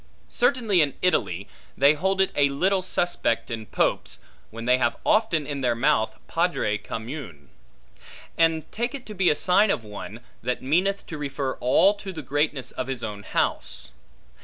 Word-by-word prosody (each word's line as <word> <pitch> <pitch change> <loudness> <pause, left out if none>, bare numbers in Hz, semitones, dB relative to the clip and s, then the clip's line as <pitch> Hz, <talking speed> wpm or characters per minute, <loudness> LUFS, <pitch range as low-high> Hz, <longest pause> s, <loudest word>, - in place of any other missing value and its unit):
Certainly 240 -8 +2
in 145 -3 +1
Italy, 100 - +1 0.3
they 140 +2 +6
hold 190 +5 +1
it 190 - +2
a 140 -1 +4
little 185 +7 +1
suspect 175 -10 0
in 110 -2 -5
popes, - - +1 0.3
when 115 +1 -8
they 125 +1 +4
have 120 -1 +1
often 210 -9 +2
in 140 -1 -4
their 120 -2 +1
mouth 110 -4 +1
Padre 150 -12 0
commune: 110 - -7 0.9
and 165 -1 +3
take 240 +5 -2
it 265 - -8
to 215 - -8
be 190 -3 +3
a - - +3
sign 195 +6 +3
of 120 - 0
one, 105 -1 -8 0.2
that 125 +2 -2
meaneth 185 +8 +1
to 155 - -7
refer 140 -2 -2
all 185 +11 +4
to 200 -1 -8
the 160 -4 -7
greatness 145 0 -1
of 130 - -4
his 130 -3 -4
own 105 -1 -5
house. 100 - -2
145 Hz, 170 wpm, -25 LUFS, 120-185 Hz, 0.9 s, they